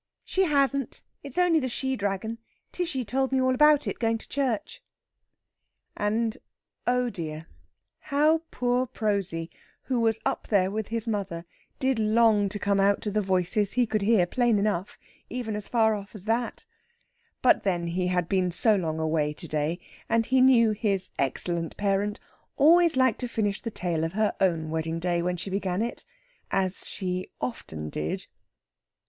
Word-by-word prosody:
"She 380 0 +1
hasn't; 275 -4 0 0.2
it's 280 +1 -8
only 355 -3 +4
the 260 -3 -2
she 265 +2 -2
dragon. 205 +2 -3 0.3
Tishy 330 -8 -2
told 265 +5 0
me 265 - +2
all 255 0 +3
about 300 +2 +5
it - - -4
going 225 -1 +1
to - - -14
church." 255 -7 -2 1.1
And, 220 +2 -1 0.5
oh 250 0 +2
dear, 155 -3 -6 0.6
how 305 +3 +3
poor 250 +1 0
Prosy, 195 -8 -1 0.3
who 255 -3 -1
was 225 -1 +2
up - - -1
there 195 -3 +2
with 215 0 -3
his 230 0 -3
mother, 195 -6 -3 0.3
did 265 -3 +1
long 215 -2 +4
to 205 - -4
come 200 -1 +1
out 200 +1 +3
to 210 - -2
the 210 +1 +1
voices 190 +2 +1
he 250 -1 +3
could 215 -2 -1
hear 200 -3 +4
plain 240 +3 +2
enough, 200 -2 -1 0.3
even 230 -3 -3
as 210 -1 -5
far 225 -2 +3
off 205 0 -7
as 200 -2 -8
that! 230 - -1 0.8
But 255 - +5
then 175 -3 0
he 180 +2 -1
had 180 -2 0
been 185 -1 +1
so 210 +5 +3
long 160 -4 -2
away 155 -2 0
to 165 - -9
day, 155 +3 -1 0.3
and 230 0 +2
he 260 +2 +3
knew 240 -4 +6
his 200 -3 +1
excellent 165 +5 -2
parent 205 +1 0 0.4
always 335 +3 +5
liked 260 -4 +3
to 250 - -3
finish 210 -3 -1
the 230 - -3
tale 175 -6 -2
of 165 +2 -2
her 215 +1 +1
own 165 -4 +1
wedding 160 0 -2
day 175 0 0
when 180 +1 -1
she 190 +3 -6
began 190 +1 -1
it 235 - -5 0.4
as 190 -1 -1
she 185 -2 -3
often 75 - -5
did. 75 +1 -3
210 Hz, 170 wpm, -27 LUFS, 180-245 Hz, 1.1 s, knew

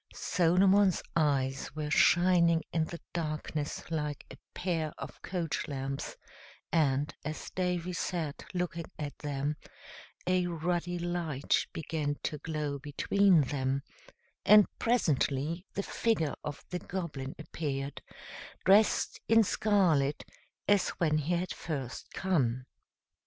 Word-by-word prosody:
Solomon's 190 +2 +3
eyes 135 -4 +1
were 150 -1 -3
shining 170 -1 +5
in 160 -1 +2
the 170 +1 -7
darkness 155 -2 -3
like 150 -3 -2
a - - -8 0.2
pair 165 -4 -1
of - - -8
coach 175 -4 -2
lamps, 135 -1 -4 0.5
and, 145 -3 +2
as 155 +2 -5
Davy 180 -1 -1
sat 165 -4 -3
looking 175 -2 -2
at 145 -2 -5
them, 145 0 -2 0.7
a 180 0 +2
ruddy 175 +1 -1
light 170 -5 0
began 150 -2 -2
to 150 - -2
glow 150 -2 -3
between 175 +5 +3
them, 135 0 -1 0.6
and 210 -1 +8
presently 165 - +1
the 200 - -1
figure 195 -12 0
of 145 -1 -6
the 180 - -2
Goblin 150 -9 -5
appeared, 145 -3 -4 0.6
dressed 200 +4 +4
in 225 0 +6
scarlet, 180 -10 +2 0.4
as 205 -2 +4
when 155 -2 +2
he 160 +4 0
had 180 +2 -2
first 135 -6 -5
come. 130 -10 0
160 Hz, 115 wpm, -31 LUFS, 145-180 Hz, 0.7 s, and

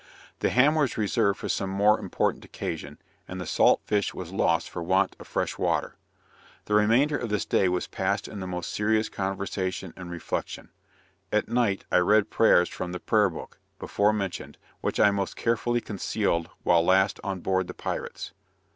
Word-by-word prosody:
The - - +1
ham 135 +5 +4
was 150 -6 0
reserved 100 -1 +1
for - - -5
some 95 - -1
more 100 +3 +3
important - - -1
occasion, 75 -3 -6 0.3
and 95 - -6
the 90 - -4
salt - - +3
fish 105 -2 0
was 90 -1 -7
lost 85 -3 +1
for 85 - -6
want 95 +3 +1
of - - -12
fresh - - -2
water. - - 0 0.7
The 105 - -3
remainder 115 +8 +4
of 120 -4 -3
this 105 -1 -1
day 95 - +2
was 90 0 -1
passed 100 +2 -2
in 105 - -8
the 95 - -5
most 90 -2 -4
serious 110 +1 +1
conversation 95 -2 -3
and 90 -2 -9
reflection. 85 -1 -5 0.6
At 105 - +1
night, 115 -5 +1
I - - +4
read 105 +3 +3
prayers 90 -6 +5
from 90 0 -5
the 90 - -4
"Prayer 105 0 +3
Book," 80 - -10 0.2
before 105 +1 +1
mentioned, 100 -4 -4 0.2
which - - -2
I 105 - +6
most 100 -1 -2
carefully 120 +1 0
concealed 100 -5 -1
while 85 -1 +4
last 95 +3 +3
on 95 -2 -3
board 95 0 0
the - - -8
pirates. - - -5
100 Hz, 180 wpm, -26 LUFS, 90-105 Hz, 0.7 s, I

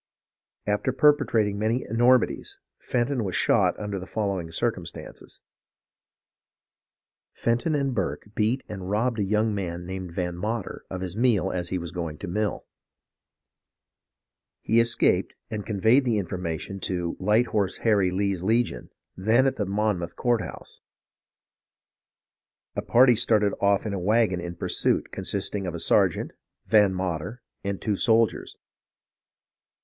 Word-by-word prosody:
"After 105 +5 0
perpetrating 120 -8 +3
many 110 +4 0
enormities, 120 +3 +2 0.2
Fenton 125 0 -1
was 95 -3 -3
shot - - +2
under 105 -2 -3
the 95 - -8
following 100 -6 -2
circumstances: 80 - -4 1.9
Fenton 120 +7 0
and 140 -2 0
Burke 100 0 -3
beat 115 +5 0
and 95 -3 -6
robbed 110 +3 0
a - - +2
young 105 +2 +1
man 90 -3 -4
named 95 -1 -6
Van 90 -1 -2
Mater 105 +3 -4
of 95 -1 -5
his 95 -1 -5
meal 110 -6 +2
as 90 -2 -2
he 95 - -1
was 85 -2 -6
going 85 -4 -4
to - - -7
mill. 105 +4 -2 2.0
He 115 - +3
escaped, 115 0 +2 0.2
and 105 -2 -4
conveyed 110 +6 +3
the 120 -4 +1
infor 95 -2 -3
mation 90 +3 -4
to 90 -2 -2
[Light 105 +5 +3
Horse 100 -3 0
Harry] 100 -5 +4
Lee's 95 -1 -1
Legion, 115 +5 0 0.3
then 110 +7 +3
at 135 - 0
the 105 - -1
[Monmouth] 100 -4 -1
courthouse. 120 -3 -2 1.9
A - - -1
party 125 0 +5
started 105 -3 +2
off 100 +1 +2
in 105 - -2
a 100 - -2
wagon 105 -1 +2
in 85 0 -6
pursuit, - - 0
consisting 100 -2 -2
of 85 - -4
a - - -4
sergeant, - - +2 0.3
Van 105 0 +5
Mater, 95 +5 -4 0.2
and 100 -1 -3
two 105 - -1
soldiers. 115 +2 +1
105 Hz, 135 wpm, -26 LUFS, 95-115 Hz, 2.0 s, party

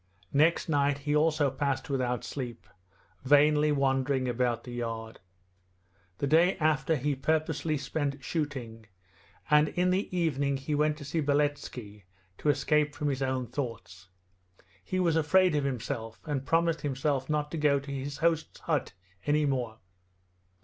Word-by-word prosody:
Next 155 +4 +3
night 145 -2 +2
he 145 +1 -1
also 150 -2 +2
passed 135 -1 -2
without 125 -3 -1
sleep, 125 -6 -6 0.6
vainly 150 +2 +4
wandering 135 -1 +1
about 120 -1 0
the 125 - -9
yard. 115 -2 -5 1.0
The - - -1
day 165 +7 +4
after 155 -1 +2
he 145 +1 0
purposely 155 +2 0
spent 140 0 -3
shooting, 125 -8 -4 0.6
and 150 0 +6
in 180 +1 +1
the 190 +3 0
evening 140 -5 +1
he 135 +3 -4
went 150 +1 +2
to 145 - -9
see 160 +3 -1
Beletski 140 -8 -2 0.3
to 150 - 0
escape 150 +1 +2
from 150 - -1
his 135 -1 -2
own 130 -1 -1
thoughts. 115 -9 -6 0.7
He 185 - -2
was 170 -3 +2
afraid 180 +3 +4
of 145 -2 +1
himself, 115 -3 -4
and 140 -3 -3
promised 165 0 +2
himself 135 -1 -1
not 150 -1 -1
to 165 - -3
go 145 -2 +3
to 140 +1 -8
his 140 +1 -4
hosts' 165 -1 0
hut - - -1 0.3
any 150 +1 +3
more. 125 -5 -1
145 Hz, 150 wpm, -29 LUFS, 130-150 Hz, 1.0 s, and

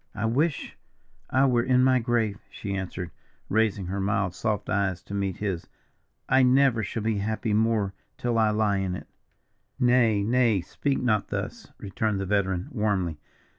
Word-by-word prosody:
"I 105 - -2
wish 140 +7 -1 0.5
I 130 +1 +3
were 125 -3 +3
in 130 +1 +3
my 130 -1 +4
grave," 115 -4 0
she 100 0 -5
answered, 95 -2 -4 0.4
raising 105 -3 +1
her 95 +3 -3
mild, 100 -2 0
soft 105 +1 -2
eyes 95 -2 0
to 100 - -9
meet 100 -2 -1
his. 95 -5 -3 0.6
"I 130 0 +4
never 130 -2 +4
shall 110 +2 -4
be 110 -2 0
happy 110 +1 -1
more 110 -2 +1 0.2
till 120 -2 0
I 110 -1 +4
lie 105 -1 +1
in 95 -2 -1
it." - - -8 0.7
"Nay, 120 -4 +3
lady, 115 -4 +2
speak 140 +9 -1
not 110 -5 +1
thus," - - -5
returned 100 +1 -2
the 95 - -2
veteran, 95 -2 0
warmly. 100 - -1
105 Hz, 165 wpm, -26 LUFS, 95-120 Hz, 0.7 s, my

